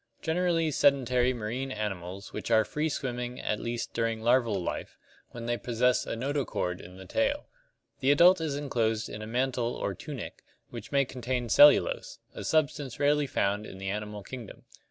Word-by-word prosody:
Generally 165 -1 +1
sedentary 130 -3 +3
marine 125 +3 -3
animals 100 -3 -5
which - - -5
are 110 -1 +4
free 150 +7 -1
swimming 125 -3 -4
at 105 - -2
least 120 0 -4
during 115 -1 -1
larval 115 -3 +2
life, 90 - -5 0.3
when 115 -1 -8
they 120 0 0
possess 125 +1 +1
a - - -2
notochord 125 -8 -2
in 90 +2 -12
the 95 - -10
tail. 280 +1 0 0.5
The 135 - +1
adult 170 +5 +6
is 155 -3 -1
enclosed 115 -6 -1
in 105 - -7
a 110 - -6
mantle 125 0 -1
or - - -2
"tunic" - - -8 0.3
which 115 -3 -8
may 140 -1 +3
contain 125 -1 -3
cellulose, - - +5 0.2
a - - -7
substance 145 -4 0
rarely 145 0 +3
found 105 -2 0
in - - -10
the 95 0 -3
animal 105 0 -5
kingdom. 120 -1 -9
125 Hz, 170 wpm, -29 LUFS, 110-145 Hz, 0.5 s, adult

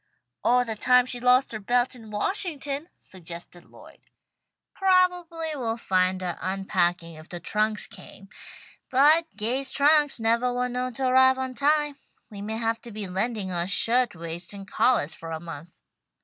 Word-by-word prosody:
"Or 245 +1 +3
the 225 -2 -4
time 250 +3 +4
she 250 -1 -4
lost 250 +2 +3
her 220 - -5
belt 245 +4 +1
in 225 -4 -12
Washington," 290 - -3
suggested 175 -1 -11
Lloyd. - - -17 0.7
"Probably 360 -3 +1
we'll 235 -5 -2
find 185 -3 +1
her 175 -2 -4
unpacking 180 -3 -1
if 155 +1 -13
the 175 - -6
trunks 215 +4 0
came. 195 - -13 0.6
But 300 +6 +5
Gay's 255 +5 -1
trunks 295 -1 +3
nevah 230 +2 +1
were 250 0 -1
known 250 0 -3
to 265 - -2
arrive 260 +1 +5
on 260 -1 -3
time. 295 +2 +1 0.3
We 200 -1 -8
may 220 +2 -4
have 225 0 -1
to 235 - -10
be 210 -2 -5
lending 195 +1 -1
her 175 -1 -2
shirtwaists 180 -6 0
and 195 -1 -9
collahs 215 - +2
for 165 - -9
a 160 -1 -4
month." 165 0 -10
230 Hz, 160 wpm, -26 LUFS, 190-260 Hz, 0.7 s, But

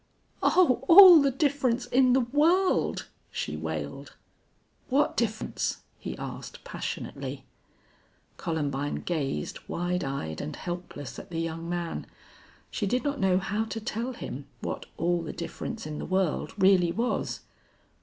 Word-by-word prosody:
"Oh, 270 -9 +4
all 355 -2 +11
the 280 - +3
difference 265 -3 +1
in 250 0 +4
the 265 - +4
world!" 315 +10 +2 0.2
she - - -4
wailed. - - -5 0.7
"What 280 +3 +2
difference?" 220 -2 -1 0.2
he - - -6
asked, - - -7
passionately. - - -5 0.9
Columbine 145 -4 -2
gazed 140 - -2
wide 180 +1 -1
eyed 80 - -4
and 75 - -5
helpless 175 -6 -6
at - - -11
the 165 - -5
young 165 0 -4
man. 175 -1 -3 0.6
She 205 - -1
did 250 +5 0
not 285 -1 -1
know 190 -1 +3
how 205 +3 -1
to 225 0 -5
tell 235 +3 -3
him - - -7
what - - -4
all 175 0 +1
the 165 - -5
difference 170 - -5
in 155 -1 -5
the - - -4
world 185 -3 0
really 190 -3 +5
was. 235 +6 -1
195 Hz, 135 wpm, -28 LUFS, 170-255 Hz, 0.9 s, all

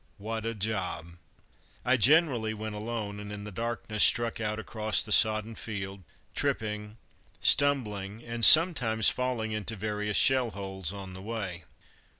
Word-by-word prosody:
What 110 +2 -5
a 115 - -4
job! 95 -5 -4 0.7
I 130 - +4
generally 130 -4 +2
went 110 0 -7
alone, 105 -1 -6
and 105 0 -9
in 105 0 -8
the 105 - -9
darkness 115 0 -2
struck 115 -1 +3
out 105 0 -3
across 110 0 0
the 110 - -9
sodden 110 +1 +3
field, 100 -3 -7 0.3
tripping, 105 0 -4 0.4
stumbling, 110 -7 +1
and 115 0 -7
sometimes 125 - +7
falling 125 -3 -3
into 110 +1 -5
various 105 0 -3
shell 130 -2 +3
holes 95 -4 -6
on 95 -2 -9
the 95 - -11
way. 95 -6 -6
110 Hz, 145 wpm, -27 LUFS, 100-115 Hz, 0.7 s, sometimes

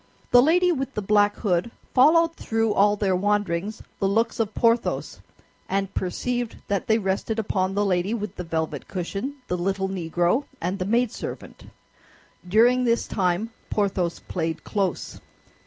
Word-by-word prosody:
The 245 - +8
lady 355 +6 +4
with 270 -5 -3
the 210 - -1
black 205 0 +3
hood 180 0 0 0.2
followed 330 +5 +5
through 225 -1 0
all 205 +1 +4
their 200 -2 +1
wanderings 205 0 -1 0.2
the 195 - +2
looks 225 +4 +1
of 220 -2 -1
Porthos, 230 0 +1 0.5
and 195 0 -1
perceived 240 +6 -2
that 200 -2 -1
they 220 - +4
rested 200 +2 -1
upon 195 -3 -1
the 205 0 +2
lady 180 +1 +1
with 210 -2 -5
the 180 - -5
velvet 160 -4 -3
cushion, 195 +9 -4
the 180 - -1
little 190 +2 -1
Negro, 175 - 0
and 185 +4 -2
the 185 - -1
maid 235 +3 +2
servant. - - -8 0.8
During 240 +6 +4
this 235 -1 +1
time 190 +3 -1 0.2
Porthos 190 -4 0
played 165 -2 -3
close. 195 -4 -2
205 Hz, 155 wpm, -24 LUFS, 185-230 Hz, 0.8 s, The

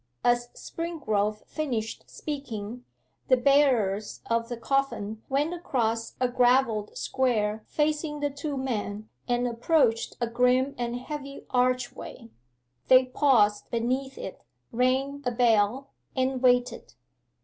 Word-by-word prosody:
As 240 0 +2
Springrove 215 -12 -2
finished 240 -8 -4
speaking, 245 -6 -6 0.4
the 255 - +5
bearers 245 -7 +2
of 230 0 0
the 240 - -4
coffin 230 -4 -1
went 290 +5 +1
across 230 -9 -1
a 255 - +3
gravelled 245 -3 +2
square 220 -5 0
facing 300 0 -1
the 290 0 -1
two 285 0 -4
men 215 -5 -3 0.2
and 245 0 +1
approached 235 -1 +1
a 240 - +1
grim 250 +3 +2
and 240 0 -3
heavy 275 +2 -7
archway. 250 - -1 0.6
They 255 0 +7
paused 250 -6 +3
beneath 255 +3 -1
it, 190 - -7 0.3
rang 265 +4 +1
a 250 - +1
bell, 240 +2 +2 0.2
and 260 -1 0
waited. 245 - +2
250 Hz, 115 wpm, -27 LUFS, 230-275 Hz, 0.6 s, They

